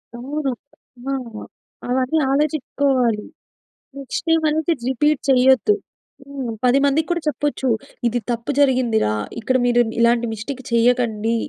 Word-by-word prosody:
అవును. 275 Hz, +3 st, -3 dB, 0.6 s
ఆ! -, -, 0 dB, 0.8 s
అవన్నీ 260 Hz, +5 st, +1 dB
ఆలోచించుకోవాలి. 275 Hz, -6 st, 0 dB, 0.7 s
నెక్స్ట్ 275 Hz, -2 st, -5 dB
టైమ్ 325 Hz, 0 st, +3 dB
అనేది 315 Hz, +2 st, +1 dB, 0.2 s
రిపీట్ 295 Hz, +3 st, +1 dB
చేయొద్దు. 265 Hz, -, +4 dB, 0.5 s
హ్మ్, 270 Hz, -4 st, -5 dB
10 250 Hz, +2 st, +4 dB
మందికి 295 Hz, +3 st, +1 dB
కూడా 345 Hz, 0 st, 0 dB
చెప్పొచ్చు. 290 Hz, -1 st, -1 dB, 0.4 s
ఇది 240 Hz, +1 st, 0 dB
తప్పు 235 Hz, +3 st, -2 dB
జరిగిందిరా! 250 Hz, -, +2 dB, 0.3 s
ఇక్కడ 255 Hz, +3 st, +1 dB
మీరు 240 Hz, 0 st, +4 dB, 0.2 s
ఇలాంటి 235 Hz, 0 st, +3 dB
మిస్టేక్ 250 Hz, +5 st, -6 dB
చేయకండి. 230 Hz, -2 st, +2 dB
260 Hz, 115 wpm, -20 LUFS, 240-285 Hz, 0.8 s, చేయొద్దు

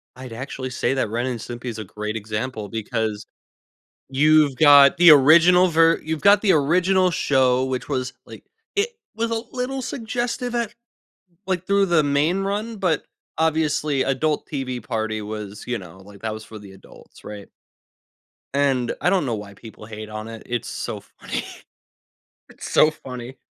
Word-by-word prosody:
I'd 130 Hz, -2 st, -9 dB
actually 130 Hz, +2 st, -6 dB
say 125 Hz, 0 st, -1 dB
that 130 Hz, -5 st, -1 dB
Ren& 120 Hz, +3 st, -2 dB
Simpy 120 Hz, +2 st, -8 dB
is 115 Hz, -3 st, -5 dB
a -, -, -4 dB
great 105 Hz, +2 st, -6 dB
example 110 Hz, 0 st, -4 dB
because 110 Hz, -1 st, -3 dB, 0.8 s
you've 150 Hz, +1 st, +4 dB
got 140 Hz, -1 st, +7 dB
the 175 Hz, -1 st, +8 dB
original 170 Hz, +6 st, +6 dB
ver 165 Hz, -1 st, +4 dB
you've 160 Hz, -1 st, -3 dB
got 200 Hz, +3 st, +6 dB
the 205 Hz, -, +3 dB
original 180 Hz, +5 st, +3 dB
show, 130 Hz, -4 st, +2 dB
which 130 Hz, -1 st, -3 dB
was, 130 Hz, -2 st, -2 dB
like -, -, -12 dB, 0.3 s
it 410 Hz, +3 st, +1 dB, 0.3 s
was 230 Hz, +1 st, -2 dB
a 225 Hz, 0 st, -1 dB
little 260 Hz, +1 st, -3 dB
suggestive 245 Hz, 0 st, -3 dB
at 235 Hz, -3 st, -1 dB
l -, -, -24 dB, 0.7 s
like, 185 Hz, -2 st, -2 dB
through 200 Hz, 0 st, +3 dB
the 170 Hz, -3 st, +3 dB
main 150 Hz, +6 st, +1 dB
run, 210 Hz, +3 st, -3 dB
but 180 Hz, -6 st, 0 dB, 0.3 s
obviously, 155 Hz, -3 st, +1 dB
adult 150 Hz, +3 st, -1 dB
TV 130 Hz, -4 st, -4 dB
party 110 Hz, -1 st, -3 dB
was, 105 Hz, -1 st, -7 dB
you 125 Hz, -1 st, -1 dB
know, 90 Hz, -3 st, -12 dB
like, 100 Hz, +1 st, -15 dB
that 110 Hz, -1 st, -3 dB
was 110 Hz, 0 st, -8 dB
for 110 Hz, -1 st, -11 dB
the 100 Hz, -1 st, -13 dB
adults, 95 Hz, -, -17 dB
right 105 Hz, -1 st, -9 dB, 1.1 s
and 135 Hz, -3 st, +1 dB
I -, -, +3 dB
don't 185 Hz, -4 st, +1 dB
know 120 Hz, -3 st, -1 dB
why 105 Hz, -1 st, -8 dB
people 110 Hz, +1 st, -13 dB
hate 110 Hz, 0 st, -8 dB
on 110 Hz, +1 st, -6 dB
it, 115 Hz, -1 st, -9 dB
it's 120 Hz, -1 st, -3 dB
so -, -, -5 dB
funny. -, -, -6 dB, 1.1 s
It's -, -, -9 dB
so 155 Hz, -, +5 dB
funny. 130 Hz, -3 st, -9 dB
135 Hz, 170 wpm, -22 LUFS, 110-170 Hz, 1.1 s, the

